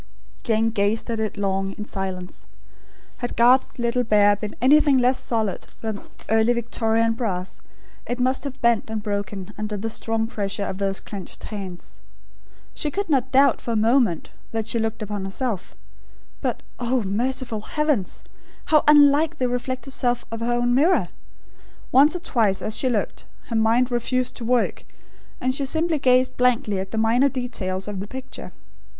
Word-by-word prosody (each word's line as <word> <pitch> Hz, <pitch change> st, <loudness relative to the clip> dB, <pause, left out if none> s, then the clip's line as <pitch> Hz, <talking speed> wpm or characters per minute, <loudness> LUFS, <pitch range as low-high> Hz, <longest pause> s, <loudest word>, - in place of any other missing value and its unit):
Jane 225 Hz, 0 st, +1 dB
gazed 215 Hz, +2 st, 0 dB
at 225 Hz, -, -2 dB
it 215 Hz, -1 st, -2 dB
long, 195 Hz, -1 st, -1 dB
in 210 Hz, -, -7 dB
silence. 190 Hz, -3 st, -5 dB, 0.7 s
Had 245 Hz, -, -4 dB
Garth's 250 Hz, +3 st, +4 dB
little 240 Hz, +1 st, 0 dB
bear 205 Hz, -2 st, +4 dB
been 210 Hz, 0 st, -6 dB
anything 285 Hz, +3 st, +5 dB
less 255 Hz, +1 st, +3 dB
solid 220 Hz, -5 st, -2 dB
than 220 Hz, -2 st, -4 dB, 0.3 s
Early 225 Hz, +2 st, +3 dB
Victorian 230 Hz, -1 st, +1 dB
brass; 190 Hz, -6 st, -3 dB, 0.5 s
it 245 Hz, +1 st, -3 dB
must 260 Hz, +2 st, +1 dB
have 275 Hz, -1 st, -6 dB
bent 235 Hz, -2 st, +2 dB
and 220 Hz, -1 st, -3 dB
broken 200 Hz, -1 st, -4 dB
under 210 Hz, 0 st, -3 dB
the 225 Hz, +3 st, -3 dB
strong 225 Hz, 0 st, -1 dB
pressure 205 Hz, -3 st, -3 dB
of 190 Hz, -, -5 dB
those 195 Hz, -1 st, -1 dB
clenched 195 Hz, -4 st, -8 dB
hands. 190 Hz, -4 st, -7 dB, 0.7 s
She 300 Hz, -, -1 dB
could 390 Hz, +2 st, -3 dB
not 265 Hz, -2 st, +1 dB
doubt, 275 Hz, +1 st, +4 dB
for 235 Hz, -, -3 dB
a -, -, 0 dB
moment, 220 Hz, -, +2 dB, 0.2 s
that 225 Hz, -1 st, -2 dB
she 230 Hz, +1 st, -1 dB
looked 225 Hz, 0 st, -2 dB
upon 205 Hz, -1 st, -4 dB
herself; 195 Hz, 0 st, -3 dB, 0.7 s
but, -, -, -2 dB, 0.2 s
oh, 245 Hz, 0 st, 0 dB
merciful 235 Hz, +2 st, -2 dB
heavens! 295 Hz, -5 st, -1 dB, 0.4 s
how 305 Hz, -1 st, +4 dB
unlike 295 Hz, +1 st, +6 dB
the 255 Hz, -, +1 dB
reflected 255 Hz, +2 st, -3 dB
self 245 Hz, -2 st, 0 dB
of 225 Hz, -, -4 dB
her 230 Hz, +1 st, -1 dB
own 240 Hz, 0 st, +1 dB
mirror! 315 Hz, +9 st, +3 dB, 0.8 s
Once 290 Hz, +6 st, +6 dB
or -, -, -2 dB
twice 215 Hz, -, +1 dB
as 215 Hz, -, -1 dB
she 260 Hz, -, +1 dB
looked, 225 Hz, -4 st, -2 dB, 0.2 s
her 230 Hz, -, -2 dB
mind 230 Hz, +3 st, +3 dB
refused 250 Hz, +1 st, -1 dB
to 235 Hz, -, -6 dB
work, 245 Hz, 0 st, +1 dB, 0.6 s
and 255 Hz, 0 st, 0 dB
she 275 Hz, -, 0 dB
simply 320 Hz, +2 st, 0 dB
gazed 255 Hz, -1 st, +3 dB
blankly 235 Hz, -5 st, +2 dB
at 190 Hz, 0 st, -4 dB
the 220 Hz, -, -5 dB
minor 235 Hz, +5 st, +3 dB
details 205 Hz, -8 st, -4 dB
of 205 Hz, -2 st, -4 dB
the 200 Hz, -, -5 dB
picture. 260 Hz, -5 st, -8 dB
230 Hz, 170 wpm, -23 LUFS, 210-255 Hz, 0.8 s, unlike